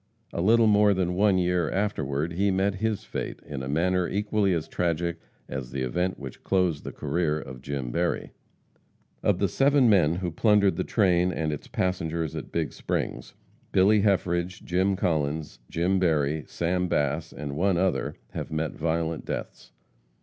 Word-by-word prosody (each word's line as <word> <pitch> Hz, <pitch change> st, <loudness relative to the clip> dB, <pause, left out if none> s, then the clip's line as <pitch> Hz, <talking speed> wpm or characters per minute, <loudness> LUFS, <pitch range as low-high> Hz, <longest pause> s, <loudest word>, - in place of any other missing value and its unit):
A -, -, -1 dB
little 115 Hz, +5 st, +5 dB
more 105 Hz, -1 st, +5 dB
than 90 Hz, -1 st, 0 dB
one 100 Hz, +1 st, +3 dB
year 90 Hz, -3 st, +1 dB
afterward 85 Hz, -6 st, -1 dB
he 100 Hz, +4 st, +1 dB
met 95 Hz, +1 st, +1 dB
his 110 Hz, -1 st, 0 dB
fate -, -, -5 dB
in 70 Hz, -3 st, -5 dB
a 65 Hz, -, -5 dB
manner 90 Hz, +4 st, +1 dB
equally 105 Hz, -1 st, +1 dB
as 85 Hz, -3 st, -1 dB
tragic 85 Hz, -1 st, -1 dB, 0.3 s
as 65 Hz, -2 st, -5 dB
the 65 Hz, +1 st, -3 dB
event 90 Hz, +9 st, -1 dB
which 65 Hz, -3 st, -9 dB
closed 90 Hz, -6 st, +1 dB
the -, -, -5 dB
career 75 Hz, 0 st, -1 dB
of 65 Hz, -3 st, -9 dB
Jim 70 Hz, -3 st, -4 dB
Berry. -, -, -1 dB, 0.9 s
Of -, -, +2 dB
the -, -, +2 dB
seven 140 Hz, -1 st, +4 dB
men 85 Hz, -5 st, +4 dB
who 90 Hz, -1 st, -3 dB
plundered 105 Hz, +1 st, +3 dB
the -, -, -1 dB
train 90 Hz, -4 st, +2 dB
and 80 Hz, -3 st, -1 dB
its 75 Hz, -, -7 dB
passengers 85 Hz, -4 st, -2 dB
at -, -, -6 dB
Big -, -, -1 dB
Springs, -, -, -3 dB, 0.4 s
Billy 100 Hz, +3 st, +5 dB
Heffridge, 90 Hz, -3 st, 0 dB
Jim 95 Hz, +2 st, +1 dB
Collins, 75 Hz, -3 st, -1 dB
Jim 90 Hz, +3 st, +1 dB
Berry, 75 Hz, -4 st, +1 dB
Sam 90 Hz, +2 st, -1 dB
Bass, 75 Hz, 0 st, 0 dB
and 70 Hz, -1 st, -6 dB
one 90 Hz, +3 st, +2 dB
other, 95 Hz, +1 st, 0 dB, 0.2 s
have -, -, -5 dB
met 80 Hz, -1 st, -1 dB
violent 80 Hz, 0 st, -2 dB
deaths. -, -, -6 dB
85 Hz, 165 wpm, -26 LUFS, 75-95 Hz, 0.9 s, little